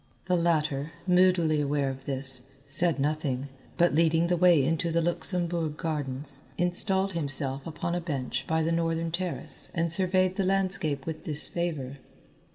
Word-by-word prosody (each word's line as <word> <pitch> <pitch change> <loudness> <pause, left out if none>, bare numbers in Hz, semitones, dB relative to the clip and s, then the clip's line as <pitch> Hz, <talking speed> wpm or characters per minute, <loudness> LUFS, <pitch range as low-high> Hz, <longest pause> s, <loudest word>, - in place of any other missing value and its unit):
The 180 0 +1
latter, 155 -3 0
moodily 180 -4 +3
aware 145 -1 0
of 135 0 -10
this, 135 -2 -3 0.2
said 155 +2 +2
nothing, 140 -2 -2 0.3
but 175 0 +3
leading 165 +1 +3
the 175 +1 +1
way 170 -5 +4
into 165 +2 0
the 165 0 +1
Luxembourg 170 -2 +1
Gardens 140 -4 -3 0.2
installed 190 +2 +2
himself 140 -3 -1
upon 170 +2 -4
a 175 - -1
bench 140 -7 -3
by 160 0 +1
the 165 - 0
northern 165 0 -1
terrace 180 +1 -4
and 165 -1 0
surveyed 185 0 +2
the 195 - +1
landscape 185 -7 0
with 160 -1 -6
disfavour. 150 -3 -1
165 Hz, 150 wpm, -27 LUFS, 145-175 Hz, 0.3 s, way